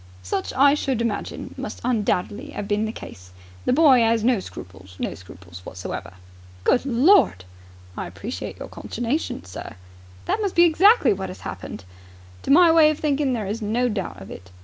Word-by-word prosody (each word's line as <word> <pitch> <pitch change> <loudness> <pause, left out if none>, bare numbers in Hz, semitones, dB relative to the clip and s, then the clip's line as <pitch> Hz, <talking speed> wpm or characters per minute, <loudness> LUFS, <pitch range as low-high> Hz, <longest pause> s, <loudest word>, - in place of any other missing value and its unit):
"Such, 95 - -3
I 280 +1 +5
should 270 -5 -1
imagine, 230 -3 -3
must - - -6
undoubtedly 230 +2 -1
have 200 - -5
been 210 +1 0
the 220 - -3
case. 90 - -11 0.4
The - - +2
boy 275 -4 +6
'as 225 -1 +2
no 245 -2 +3
scruples, 95 - -11
no - - -3
scruples 90 -1 -13
whatsoever." 90 0 -7 0.5
"Good 250 - +2
Lord!" 255 - +4 0.5
"I - - -4
appreciate - - -7
your - - -7
consternation, 240 - -4
sir." 95 - -9 0.5
"That 435 - -1
must 400 -3 -2
be 345 - +7
exactly 350 - +5
what 190 -1 -5
has 185 - -10
happened." 95 - -7 0.6
"To - - -8
my 335 +3 +7
way 320 -2 +6
of 305 - -1
thinking 285 -3 0
there 220 -4 -2
is 210 +4 -4
no 235 +4 0
doubt 195 - -4
of 95 - -11
it. 90 0 -11
230 Hz, 175 wpm, -23 LUFS, 185-285 Hz, 0.6 s, be